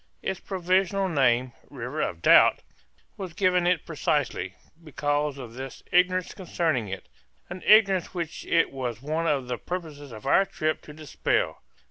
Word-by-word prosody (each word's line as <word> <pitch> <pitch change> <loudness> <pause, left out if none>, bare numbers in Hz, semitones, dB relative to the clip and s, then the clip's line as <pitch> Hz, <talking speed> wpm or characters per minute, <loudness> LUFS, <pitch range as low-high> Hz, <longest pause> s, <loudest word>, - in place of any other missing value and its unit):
Its 190 - -2
provisional 190 +1 0
name 130 -6 +2 0.2
"River - - -5
of 85 -1 -3
Doubt" - - +6 0.5
was 185 -4 -6
given 180 -1 +2
it 175 -3 +1
precisely 145 - -1 0.3
because 145 -1 -1
of 120 -4 -9
this 130 +1 -8
ignorance 180 0 +2
concerning 165 - -1
it; 95 0 -7 0.4
an 180 +1 -6
ignorance 195 -5 +5
which 170 -3 -5
it 165 -1 +3
was 125 -3 -5
one 160 +3 -1
of 140 -5 0
the 125 -1 -3
purposes 155 -6 -6
of 110 -2 -10
our 195 - +5
trip 155 -5 -2
to - - -12
dispel. 155 -1 -1
155 Hz, 150 wpm, -26 LUFS, 135-180 Hz, 0.5 s, Doubt